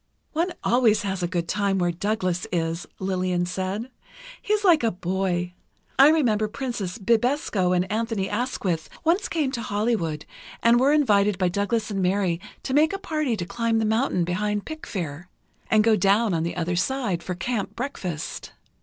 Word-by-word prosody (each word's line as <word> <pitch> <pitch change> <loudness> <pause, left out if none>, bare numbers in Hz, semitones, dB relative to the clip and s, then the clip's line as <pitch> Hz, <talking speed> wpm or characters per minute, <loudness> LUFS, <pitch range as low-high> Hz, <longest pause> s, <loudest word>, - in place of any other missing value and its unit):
"One 340 +3 0
always 230 -4 +3
has 195 -2 -2
a 175 - 0
good 170 -1 -2
time 200 +1 0
where 175 -1 +1
Douglas 185 -1 -1
is," 165 0 -2
Lillian 185 -2 0
said. 190 +7 -3 0.5
"He - - -4
is 425 0 +2
like 345 -6 +5
a 230 - +2
boy. 180 -1 -2 0.5
I 275 +2 +9
remember 230 -9 +2
Princess 215 -6 -4
Bibesco 230 -3 +1
and 180 +1 +1
Anthony 220 -3 -1
Asquith 200 -7 -2
once 345 +5 +2
came 300 -5 0
to 240 - -3
Hollywood 205 -8 -1 0.4
and 235 +1 +5
were 270 +3 +4
invited 210 -9 +3
by 185 -1 +2
Douglas 210 +4 -1
and 195 -1 -1
Mary 185 -2 +1 0.2
to 260 - -3
make 310 +5 +4
a - - -1
party 305 - -1
to 175 - -3
climb 230 +4 0
the 220 - +1
mountain 220 -4 +1
behind 205 +4 -1
Pickfair, 180 - -6 0.4
and 215 -1 +5
go 225 0 +5
down 205 +2 +3
on 165 - 0
the 170 +1 -2
other 175 +1 -1
side, 195 -2 -1
for 180 +1 -4
camp 210 +3 -3
breakfast. 190 - -5
205 Hz, 170 wpm, -25 LUFS, 180-240 Hz, 0.5 s, I